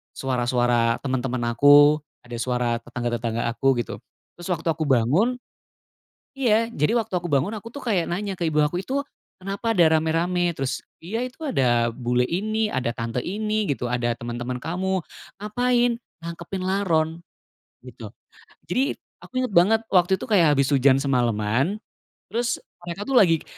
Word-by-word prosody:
suara-suara 120 -2 +1
teman-teman 130 -2 -2
aku, 145 +4 +6 0.2
ada 120 -1 -7
suara 120 -1 0
tetangga-tetangga 120 -1 -2
aku, 135 +3 +2
gitu. - - -8 0.4
Terus 175 - -7
waktu 165 -1 -2
aku 160 0 -2
bangun 145 - +3 1.0
iya 230 -4 +2
jadi, 150 +1 0
waktu 220 -4 -3
aku 175 -1 -1
bangun, 140 +7 +2
aku 230 +3 -11
tuh 285 - -7
kayak 195 -8 0
nanya 195 +3 -2
ke - - -5
ibu 155 -1 0
aku, 150 +4 0
"Itu, 270 +7 -2 0.4
kenapa 200 +4 -2
ada 160 -3 +5
rame-rame? 170 +2 0
Terus 135 -3 -2 0.2
iya 225 +9 -3
itu 255 +6 -12
ada, 120 - +2
bule 125 +1 0
ini, 215 +4 -1
ada 125 -2 -1
tante 115 0 -3
ini 215 +2 -1
gitu, 130 -5 -2
ada 120 -1 0
teman-teman 120 +1 -5
kamu. 185 +2 -1 0.4
Ngapain? 240 +2 +1 0.2
Nangkepin 170 +3 -6
laron," 170 -4 0 0.6
gitu. - - -11 0.5
Jadi, 270 +4 +1 0.3
aku - - -14
inget 255 -5 -2
banget, 200 +6 +5
waktu 185 0 +3
itu - - -5
kayak 175 -9 +4
habis 140 -1 +3
hujan 135 0 +4
semalaman. 125 - 0 0.5
Terus 235 +1 -1 0.3
mereka 175 +3 -5
tuh 270 +4 -2
lagi, 165 -5 +4
160 Hz, 150 wpm, -24 LUFS, 125-200 Hz, 1.0 s, aku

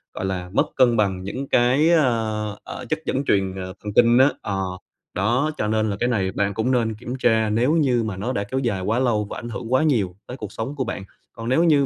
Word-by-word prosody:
gọi - - -3
là, 90 -2 -3
mất - - +3
cân 120 -3 +4
bằng 95 -3 0
những 130 +8 -5
cái, 130 +6 +4
ờ, 110 -9 +1
ờ, - - -7
chất 155 0 0
dẫn 135 +2 -1
truyền, 95 -4 +1
ờ, 95 -1 -6
thần 105 -1 -5
kinh 120 0 +5
á 135 +2 +6
ờ, 95 -2 -2 0.5
đó, 120 - +1
cho 105 - -1
nên 110 0 +1
là 100 - -1
cái 120 - +1
này 95 -5 0
bạn 100 +1 -1
cũng 110 +6 0
nên 115 -3 +1
kiểm 125 +3 -6
tra, 110 -3 +3
nếu 120 +8 +2
như 130 -7 +2
mà 105 -4 -4
nó 120 +6 -2
đã 100 - -1
kéo 130 +6 -3
dài 110 -8 -1
quá 110 +6 0
lâu 110 -5 +1
và - - -6
ảnh 120 - -6
hưởng 115 +3 -5
quá 130 - +4
nhiều 105 - +1
tới 125 - -7
cuộc 105 -4 -7
sống 115 +8 -5
của 135 - -1
bạn. 115 -5 -5 0.3
Còn 115 +1 -6
nếu 160 +6 +3
như 145 -5 +4
115 Hz, 255 wpm, -23 LUFS, 100-130 Hz, 0.5 s, á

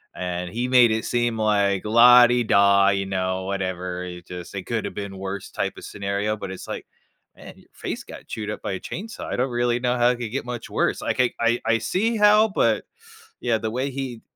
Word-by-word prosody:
and 90 -1 -4
he 120 +4 -2
made 125 -2 +6
it 110 0 -1
seem 120 -1 0
like, 100 -3 +2
"la-di-da, 115 -4 +6
you 95 -1 0
know, 95 -1 -2
whatever, 90 -2 -3
it 90 -1 -9
just 90 -1 -8
it 95 - -4
coulda 115 -2 -2
been 100 -1 -6
worse," 95 0 -5
type - - -3
of - - -10
scenario, 100 +2 -2
but 95 - -6
it's 95 - -8
like, - - -6 0.5
"Man, - - -12
your - - -21
face - - -5
got - - -12
chewed 105 -2 -5
up - - -7
by - - -3
a 95 - -4
chainsaw. 220 - -7
I - - -3
don't 130 +2 0
really 120 0 +1
know 125 0 0
how 120 0 +4
it 125 - 0
could 115 -3 -4
get 135 +1 -3
much 120 -2 -6
worse." - - 0
Like, - - -2
I 125 - +2
I 120 +1 +2
I 115 0 +3
see 225 - 0
how, 210 +1 +6
but, 195 - +1 0.6
yeah, 120 -2 +1
the 110 0 -3
way 130 +4 -2
he 130 -4 -5
110 Hz, 215 wpm, -23 LUFS, 95-120 Hz, 0.6 s, made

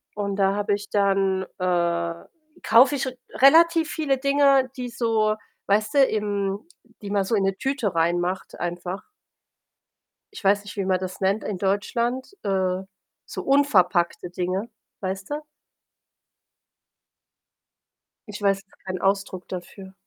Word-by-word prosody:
und 200 -1 -2
da 195 0 +2
habe 205 0 0
ich 205 0 -8
dann, 195 -2 +2 0.2
äh 170 -2 0 0.5
kaufe 260 +5 +6
ich 270 - -1
r 260 - -4 0.2
relativ 325 +3 +5
viele 280 -4 0
Dinge, 275 -1 +4
die 250 -1 -4
so, 220 -3 +1 0.3
weißt 210 +4 +1
du, - - +5
im 205 -3 -1 0.4
die 205 - -6
man 200 -1 +2
so 210 - -2
in 200 - +1
'ne 195 0 0
Tüte 255 -9 -1
reinmacht 175 +3 -1
einfach. 175 +2 -4 1.3
Ich - - -9
weiß 200 +1 +3
nicht, 205 - -9
wie 195 - -1
man 185 -1 +2
das 185 +1 -6
nennt 195 +3 +1
in 200 -3 -3
Deutschland. 235 - -1
Äh, 190 -2 0 0.4
so - - -6
unverpackte 185 -12 +2
Dinge, 185 +5 -3 0.3
weißt 190 0 -4
du? 295 +1 -3 2.9
Ich 210 0 -7
weiß 195 -1 +1
gar 195 - -27
keinen 185 -1 -4
Ausdruck 195 -1 -1
dafür. 190 +1 -8
200 Hz, 140 wpm, -24 LUFS, 185-235 Hz, 2.9 s, kaufe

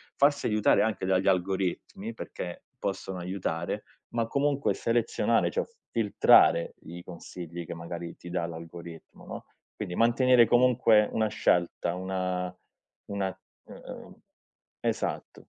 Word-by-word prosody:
farsi 140 0 +3
aiutare 105 -1 +4
anche 110 -4 0
dagli 95 0 +2
algoritmi 95 - -1
perché 90 - -7 0.2
possono 95 -1 -3
aiutare, 90 -2 -3 0.3
ma 115 -1 -1
comunque 140 +2 +1
selezionare 115 0 +1
cioè 485 - 0
f 465 - -27 0.2
filtrare 105 -6 +5
i 85 +2 -9
consigli 85 0 -8
che - - -6
magari 85 0 -6
ti 90 - -11
dà 85 -1 -1
l'algoritmo, 85 0 -10
no, - - -8 0.3
quindi 90 - -5
mantenere 120 +2 +5
comunque 120 -3 +5
una 110 -1 +1
scelta, 90 -4 +1
una 90 -1 -2 0.6
una, 95 -2 -2 0.3
ehm - - -10 0.7
esatto. - - -3
95 Hz, 120 wpm, -28 LUFS, 85-115 Hz, 0.7 s, filtrare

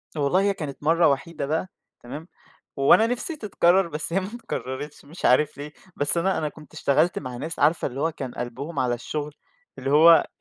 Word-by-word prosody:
والله 150 +5 +2
هي 200 0 +2
كانت 150 -6 -7
مَرّة 165 +2 +4
وحيدة 140 +2 -2
بقى 160 +6 -1 0.4
تمام، 145 +7 -8 0.5
وأنا 140 +11 +5
نِفسي 245 +7 -3
تتكرر 190 - +2
بس 155 +1 -4
هي 190 - +3
ما 190 - -5 0.2
تكررتش 135 +4 -6
مش 160 +5 -7
عارف 145 +4 +3
ليه، 145 +1 -7 0.2
بس 145 +4 +4
أنا 190 +3 +1
أنا 155 - -1
كنت 150 +1 -16
اشتغلت 150 +5 +1
مع 125 -3 -7
ناس 160 +6 -5
عارفة 155 +3 +2
اللي 135 0 -7
هو 165 +2 +1
كان 130 -5 -7
قلبهم 135 +6 -5
على 125 -2 +1
الشغل، 145 +4 -5 0.5
اللي 135 - -3
هو 155 +3 +7
آآ، 165 -2 +6
150 Hz, 195 wpm, -24 LUFS, 140-170 Hz, 0.5 s, هو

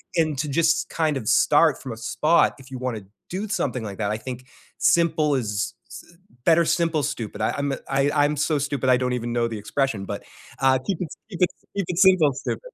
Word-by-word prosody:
and 155 -4 +1
to 150 - -1
just 165 +3 +2
kind 155 -3 0
of 110 - -6
start 150 +3 +4
from 130 - -6
a - - -10
spot 155 +8 +2
if 130 - -14
you 130 - -6
want 125 -2 -3
to 105 - -9 0.2
do 195 +4 -4
something 130 - -2
like 100 -3 -6
that, 105 -2 -1
I 110 - -1
think 125 +2 -7 0.3
simple 160 -3 +3
is 105 -6 -1 0.2
s - - -12 0.3
better 170 0 +5
simple 165 -1 +1
stupid. 120 -7 -4
I 110 - 0
I'm 140 0 -1
a 135 - -3
I 135 +1 +2
I'm 145 0 +2
so 155 0 +1
stupid 140 -2 -2
I 125 - +5
don't 125 0 -1
even 120 -1 -3
know 120 -1 +1
the 115 -1 -5
expression, 110 -1 -2
but, - - -5 0.4
uh, 135 0 +4
keep 190 -4 -2
it 180 - -2 0.2
keep 180 - -7
it 180 - +6 0.3
keep 200 -2 -1
it 175 - -3
simple 185 -6 +5
stupid. 130 - -4
140 Hz, 225 wpm, -24 LUFS, 125-160 Hz, 0.4 s, it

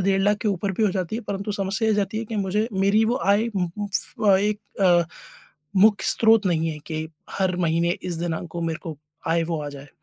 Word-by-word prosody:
डेढ़ 195 +1 +2
लाख 205 +1 +3
के 215 - +1
ऊपर 195 0 -1
भी - - +1
हो 205 - +3
जाती 185 +2 -2
है, 235 - -5
परंतु 200 0 -4
समस्या 195 +2 -1
ये 215 - +3
आ - - -1
जाती 205 +1 -1
है 230 - -3
कि 220 0 -5
मुझे 205 +3 0
मेरी 200 +3 +3
वो 235 +3 +1
आय 205 +3 +4
उम 185 -5 -2
उम 205 - -2
फ 200 +2 -2
अ, 195 - +7
एक 205 +1 0 0.2
अ, 175 -2 +5 0.7
मुख्य 210 +2 +5
स्रोत 225 -2 +4
नहीं 165 -2 +1
है 155 - -6
कि 155 -1 -4 0.2
हर 185 -2 0
महीने 170 0 +1
इस 180 - -3
दिनांक 170 0 -3
को 170 - -5
मेरे 165 -1 -2
को 160 -2 -6 0.3
आय 165 0 +2
वो 160 -2 -3
आ 145 - -4
जाए। 140 0 -11
195 Hz, 245 wpm, -24 LUFS, 170-210 Hz, 0.7 s, अ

